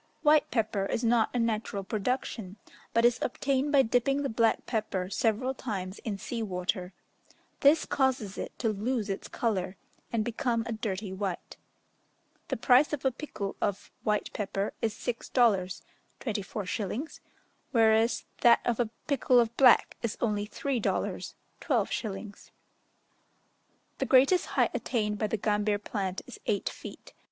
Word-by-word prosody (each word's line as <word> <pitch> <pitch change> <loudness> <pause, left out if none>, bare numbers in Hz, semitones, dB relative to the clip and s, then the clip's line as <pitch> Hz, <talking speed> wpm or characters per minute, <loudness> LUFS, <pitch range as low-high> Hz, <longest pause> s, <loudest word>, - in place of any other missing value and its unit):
White 300 0 +5
pepper 215 -4 0
is 230 - -2
not 230 -1 +3
a - - -2
natural 220 -3 -1
production, 210 -1 -2 0.4
but 230 +1 +3
is 240 -1 +4
obtained 275 +2 0
by 280 -2 +6
dipping 255 +4 +1
the 275 - -1
black 225 0 +2
pepper 200 -5 -2
several 230 +5 +1
times 195 -7 -5
in 210 -3 -4
sea 230 +3 -4
water: 180 -2 -2 0.7
this 295 +3 +5
causes 260 -8 0
it - - -5
to 230 - 0
lose 215 0 -1
its 195 - -5
colour, 190 -5 -2 0.3
and 220 -2 0
become 235 0 0
a 235 - -4
dirty 205 -3 -3
white. 190 -2 -4 0.9
The - - -2
price 265 +4 +4
of 285 -2 -3
a 265 - +4
pikul 225 -7 -5
of 200 - -2
white 210 -1 -1
pepper 200 -1 -2
is 220 -2 0
six 240 -2 -4
dollars 200 -7 +2 0.4
(24s.), 210 - -3 0.5
whereas 225 -1 +3
that 235 -1 +6
of 240 -1 0
a 235 -3 +1 0.2
pikul 265 -4 +4
of 235 -1 +1
black 255 -3 +5
is 230 -2 -2
only 210 -3 0
three 270 +3 -2
dollars - - -2 0.3
(12s.). 205 -1 -2 1.5
The - - +1
greatest 275 +8 +5
height - - +4
attained 210 -4 -1
by 215 - +1
the 220 - -1
gambir 210 0 +1
plant 195 -2 -4
is - - -11
eight 205 - 0
feet. - - -11
225 Hz, 145 wpm, -29 LUFS, 205-245 Hz, 1.5 s, by